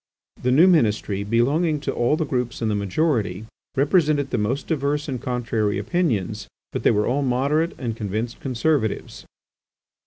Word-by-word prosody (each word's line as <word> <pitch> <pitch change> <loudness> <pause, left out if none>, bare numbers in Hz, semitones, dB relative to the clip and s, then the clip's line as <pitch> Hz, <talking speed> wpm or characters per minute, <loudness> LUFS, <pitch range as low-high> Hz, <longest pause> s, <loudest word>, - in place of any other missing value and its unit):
The 125 - 0
new 150 +7 +6
ministry, 105 - +2
belonging 140 +9 +1
to - - -2
all 120 +6 +1
the 160 - -1
groups 125 -4 -2
in 115 - 0
the - - 0
majority, 105 - 0 0.3
represented 145 -1 +2
the 125 - 0
most 120 +7 -1
diverse 145 -1 -1
and 130 -4 -4
contrary 120 -5 -1
opinions, 110 - -1 0.2
but - - -3
they - - +4
were 105 -1 +2
all 135 +4 0
moderate 140 +5 +1
and 120 -5 -3
convinced 110 +2 -3
conservatives. 130 -2 -1
125 Hz, 155 wpm, -23 LUFS, 110-150 Hz, 0.3 s, new